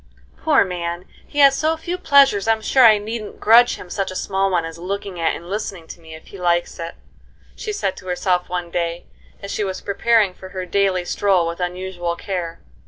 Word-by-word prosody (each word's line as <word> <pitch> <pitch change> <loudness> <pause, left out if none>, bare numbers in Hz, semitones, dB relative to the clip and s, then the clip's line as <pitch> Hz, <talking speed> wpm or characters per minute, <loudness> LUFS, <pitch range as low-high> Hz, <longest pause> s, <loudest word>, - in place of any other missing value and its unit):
"Poor 310 -2 +3
man, 175 -1 -4 0.2
he 290 - -11
has 275 -1 +7
so 320 +3 0
few 345 +3 -4
pleasures 275 - +4
I'm 220 -1 +2
sure 260 +3 +4
I 220 -3 +8
needn't 215 +1 -6
grudge 235 +3 +6
him - - -11
such 195 -2 -2
a 185 - -7
small 195 +1 0
one 175 -3 0
as 165 0 -8
looking 195 0 -5
at 165 - +1
and 170 - -10
listening 195 -3 -4
to - - -9
me 160 -1 -11
if 160 - -14
he 195 - -11
likes 175 -1 0
it," 165 0 -6 0.6
she 430 - -5
said 405 - -2
to 185 - -12
herself 180 0 0
one 175 -1 -4
day, 170 0 -2 0.4
as 200 - -5
she 210 - -1
was 190 -2 -3
preparing 205 0 +2
for 190 +1 -12
her 185 -1 -5
daily 185 -1 +1
stroll 185 -3 +1
with 170 +1 -5
unusual 180 -1 -3
care. 175 -3 -5
190 Hz, 210 wpm, -20 LUFS, 175-215 Hz, 0.6 s, I